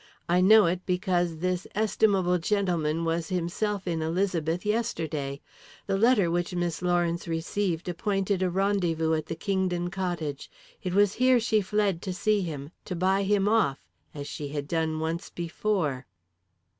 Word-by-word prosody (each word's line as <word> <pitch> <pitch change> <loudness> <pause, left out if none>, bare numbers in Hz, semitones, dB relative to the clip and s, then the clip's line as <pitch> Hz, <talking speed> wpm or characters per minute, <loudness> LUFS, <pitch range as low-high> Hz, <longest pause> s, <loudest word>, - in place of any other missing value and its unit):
I 175 +1 +3
know 215 +3 +7
it 175 +2 0
because 180 -3 0
this 185 +2 -2
estimable 195 -4 +2
gentleman 170 -4 0
was 165 0 -1
himself 185 +3 -2
in 165 -3 -1
Elizabeth 170 0 -1
yesterday. 160 -11 -2 0.4
The - - 0
letter 205 -4 +4
which 175 +1 -1
Miss 175 -2 -2
Lawrence 175 -1 0
received 170 +1 -2
appointed 195 +2 -1
a 185 - +2
rendezvous 175 -4 +1
at 155 -1 -1
the - - -3
Kingdon 180 0 -1
cottage. 175 -7 -3 0.3
It 185 0 -3
was 205 -1 +4
here 255 -1 +5
she 220 -2 +2
fled 200 -3 0
to 185 - -4
see 205 +2 +1
him 150 -4 -5
to 180 - -4
buy 190 +3 +2
him 200 0 +2
off, 210 -11 +3 0.3
as 145 -1 -7
she 145 0 -5
had 145 0 -4
done 160 0 -1
once 165 +2 -3
before." 170 -6 -2
180 Hz, 155 wpm, -27 LUFS, 165-200 Hz, 0.4 s, know